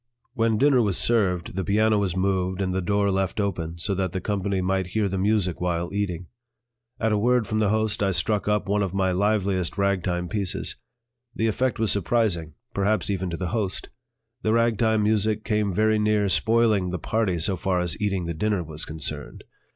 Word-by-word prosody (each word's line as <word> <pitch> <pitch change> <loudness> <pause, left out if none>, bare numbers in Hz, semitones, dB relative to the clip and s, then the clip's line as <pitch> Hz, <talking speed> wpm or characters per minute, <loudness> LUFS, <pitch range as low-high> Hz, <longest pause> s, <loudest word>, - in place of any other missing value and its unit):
When 115 -3 +1
dinner 135 0 +4
was 100 -5 0
served, 95 -7 +1
the 95 - -1
piano 105 +3 +2
was 95 -3 -1
moved 95 -1 0
and 95 -2 -1
the 95 - 0
door 100 +2 +1
left 95 +1 -1
open, 85 -5 -2
so 95 +4 -2
that 95 -2 -2
the 95 - -1
company 100 0 -1
might 95 0 0
hear 105 -2 +2
the 95 0 -2
music 100 -4 +1
while 85 0 -1
eating. 90 -4 -2 0.7
At 110 0 +1
a 105 - +2
word 120 +1 +2
from 110 -1 -1
the 105 -2 +2
host 110 0 +1
I 100 - +2
struck 100 +2 0
up 105 0 +1
one 105 +1 +1
of 95 -1 -2
my 95 -1 +1
liveliest 100 -2 0
ragtime 95 -3 0
pieces. 100 0 -1 0.6
The 110 - 0
effect 125 +3 0
was 110 -2 +1
surprising, 95 -6 0 0.2
perhaps 100 +1 +1
even 95 -2 -2
to 85 - -4
the 90 -1 -3
host; 105 -3 -3 0.5
the 110 - +1
ragtime 115 -2 +2
music 110 0 +1
came 105 -2 0
very 110 +3 +2
near 105 -1 +2
spoiling 110 -1 +2
the 90 - -2
party 100 0 0
so 90 +4 +1
far 90 0 0
as 90 -2 -1
eating 95 -4 0
the 85 - -3
dinner 100 +2 0
was 80 0 -5
concerned. 80 -2 -5
100 Hz, 195 wpm, -25 LUFS, 90-110 Hz, 0.7 s, dinner